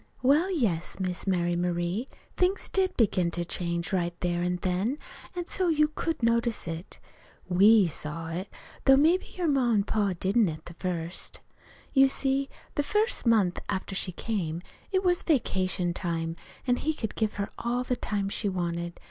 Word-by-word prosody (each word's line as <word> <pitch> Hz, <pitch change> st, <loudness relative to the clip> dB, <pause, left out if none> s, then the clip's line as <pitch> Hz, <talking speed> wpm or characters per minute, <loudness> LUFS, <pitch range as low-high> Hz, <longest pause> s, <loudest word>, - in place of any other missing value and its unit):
"Well, 295 Hz, +8 st, +4 dB
yes, 205 Hz, -, 0 dB
Miss 185 Hz, 0 st, -2 dB
Mary 175 Hz, -2 st, +1 dB
Marie, 175 Hz, +6 st, -1 dB, 0.3 s
things 370 Hz, +2 st, +1 dB
did 380 Hz, -1 st, +2 dB
begin 190 Hz, -6 st, +3 dB
to 175 Hz, -, -1 dB
change 170 Hz, +1 st, -2 dB
right 175 Hz, -2 st, -1 dB
there 175 Hz, -1 st, 0 dB
an' 180 Hz, 0 st, 0 dB
then, 190 Hz, +9 st, 0 dB, 0.4 s
an' 350 Hz, -1 st, -3 dB
so 370 Hz, +1 st, 0 dB
you 305 Hz, -2 st, +3 dB
could 315 Hz, -2 st, -3 dB
notice 230 Hz, -3 st, +1 dB
it. 165 Hz, +2 st, -6 dB, 0.5 s
We 200 Hz, +3 st, +6 dB
saw 165 Hz, 0 st, -4 dB
it, 180 Hz, +4 st, -4 dB, 0.4 s
though 270 Hz, 0 st, +7 dB
maybe 325 Hz, +6 st, +4 dB
your 360 Hz, -, 0 dB
pa 275 Hz, -, +3 dB
an' 210 Hz, -3 st, +3 dB
ma 205 Hz, -3 st, +2 dB
didn't, 200 Hz, +1 st, +3 dB
at 155 Hz, -1 st, -7 dB
the 175 Hz, -, -9 dB
first. 175 Hz, -1 st, -3 dB, 0.5 s
"You 270 Hz, -1 st, +7 dB
see, 270 Hz, 0 st, 0 dB, 0.2 s
the -, -, +1 dB
first 420 Hz, -, 0 dB
month 205 Hz, -6 st, +3 dB
after 195 Hz, 0 st, -2 dB
she 185 Hz, -1 st, -1 dB
came, 175 Hz, -4 st, -3 dB, 0.3 s
it 380 Hz, 0 st, +2 dB
was 355 Hz, -1 st, +3 dB
vacation 185 Hz, -, +1 dB
time, 165 Hz, -2 st, -2 dB, 0.3 s
an' 245 Hz, -1 st, +2 dB
he 315 Hz, +1 st, -1 dB
could 220 Hz, -7 st, -4 dB
give 220 Hz, -1 st, 0 dB
her 200 Hz, -1 st, -3 dB
all 245 Hz, +1 st, 0 dB
the 250 Hz, -, 0 dB
time 205 Hz, -4 st, -2 dB
she 205 Hz, +1 st, -1 dB
wanted. 170 Hz, -2 st, -3 dB
200 Hz, 175 wpm, -28 LUFS, 175-270 Hz, 0.5 s, though